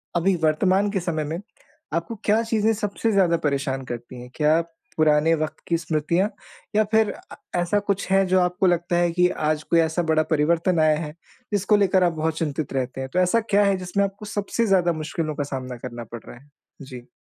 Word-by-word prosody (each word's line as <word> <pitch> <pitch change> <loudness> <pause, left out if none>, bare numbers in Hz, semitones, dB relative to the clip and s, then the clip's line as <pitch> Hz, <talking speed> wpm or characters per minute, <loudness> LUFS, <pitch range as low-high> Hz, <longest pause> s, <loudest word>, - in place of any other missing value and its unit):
अभी 185 +3 +2
वर्तमान 185 +6 +2
के 195 - 0
समय 165 -3 -2
में, 160 +3 -4 0.5
आपको 170 +7 -2
क्या 215 +2 +3
चीज़ें 225 -1 +1
सबसे 210 +1 -1
ज़्यादा 185 -5 +3
परेशान 140 -3 -1
करती 120 0 -7
हैं? 125 - -11
क्या 155 +2 +3 0.4
पुराने 155 +1 +4
वक़्त 155 0 -4
की 170 - +2
स्मृतियाँ 165 +4 0 0.5
या 215 - +5
फिर 220 -1 +3
अ, - - -13 0.2
ऐसा 175 +4 +1
कुछ 200 -1 -2
है 195 0 +4
जो 185 0 +3
आपको 180 +1 +1
लगता 175 0 +1
है 175 0 +2
कि 180 +1 +3
आज 155 -2 -1
कोई 170 - +2
ऐसा 160 +1 +1
बड़ा 155 0 +3
परिवर्तन 165 +3 +2
आया 155 -1 +4
है, 150 -2 -5 0.4
जिसको 205 +1 +3
लेकर 190 -2 +3
आप 175 -1 +2
बहुत 160 0 -2
चिंतित 155 -3 -3
रहते 130 0 -2
हैं? 130 - -5
तो 180 - +2
ऐसा 185 +5 +3
क्या 205 0 +4
है 200 -1 +2
जिसमें 185 +2 -1
आपको 200 +2 -7
सबसे 210 +2 -1
ज़्यादा 180 -4 +3
मुश्किलों 155 0 -3
का 145 - -2
सामना 130 -2 -5
करना 120 0 -7
पड़ 115 -1 -7
रहा - - -11
है? 140 +4 -20 0.3
जी। 125 -3 -10
170 Hz, 205 wpm, -23 LUFS, 150-195 Hz, 0.5 s, या